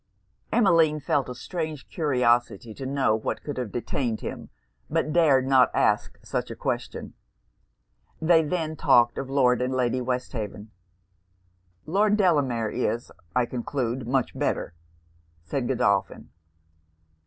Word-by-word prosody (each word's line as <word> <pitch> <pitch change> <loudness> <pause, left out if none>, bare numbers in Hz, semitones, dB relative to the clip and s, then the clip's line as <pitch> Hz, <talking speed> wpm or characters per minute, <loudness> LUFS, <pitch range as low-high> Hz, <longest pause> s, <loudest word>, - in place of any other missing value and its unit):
Emmeline 165 -9 +4
felt 140 -2 0
a 125 - -6
strange 155 0 -5
curiosity 120 - +1
to 130 +4 -6
know 135 -5 +2
what 110 - -4
could 145 - -5
have 125 -5 -3
detained 120 -1 -2
him; - - -6 0.4
but 155 -1 0
dared 145 -6 +4
not 130 -1 +5
ask - - +1
such - - -3
a - - -6
question. - - -4 1.1
They 160 0 +5
then 160 0 -2
talked 120 -6 +4
of 135 - -5
Lord 125 -3 +3
and 130 +1 -1
Lady 125 0 0
Westhaven. 115 -4 -4 1.1
'Lord 205 +5 +2
Delamere 135 - +2
is, 120 -1 -2 0.2
I 125 -1 +3
conclude, 125 0 -3
much 130 0 0
better?' - - -2 0.7
said 120 +10 -2
Godolphin. 100 -6 0
130 Hz, 125 wpm, -26 LUFS, 120-155 Hz, 1.1 s, not